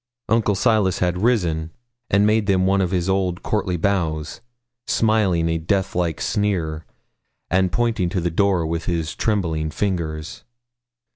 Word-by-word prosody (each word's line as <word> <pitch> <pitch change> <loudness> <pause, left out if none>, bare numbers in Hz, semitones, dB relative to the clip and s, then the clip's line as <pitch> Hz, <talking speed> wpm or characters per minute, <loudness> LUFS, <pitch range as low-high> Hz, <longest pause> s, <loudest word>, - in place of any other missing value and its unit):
Uncle 110 -2 +2
Silas 105 -3 +2
had 90 0 0
risen, 85 -9 +1 0.4
and 100 +1 +4
made 105 -1 +2
them 95 -2 +3
one 95 +1 +3
of 90 - 0
his 90 -1 -1
old 95 -2 0
courtly 95 -4 -1
bows, 80 -5 -1 0.5
smiling 105 -7 +2
a 80 0 0
death 95 +4 -1
like 85 -4 -1
sneer, 85 -7 -1 0.6
and 95 0 +2
pointing 115 -6 0
to 90 - -1
the 85 0 -1
door 95 -1 +2
with 80 +1 -3
his 85 -3 -2
trembling 85 -8 -1
fingers. 80 -4 -3
90 Hz, 145 wpm, -22 LUFS, 85-100 Hz, 0.6 s, and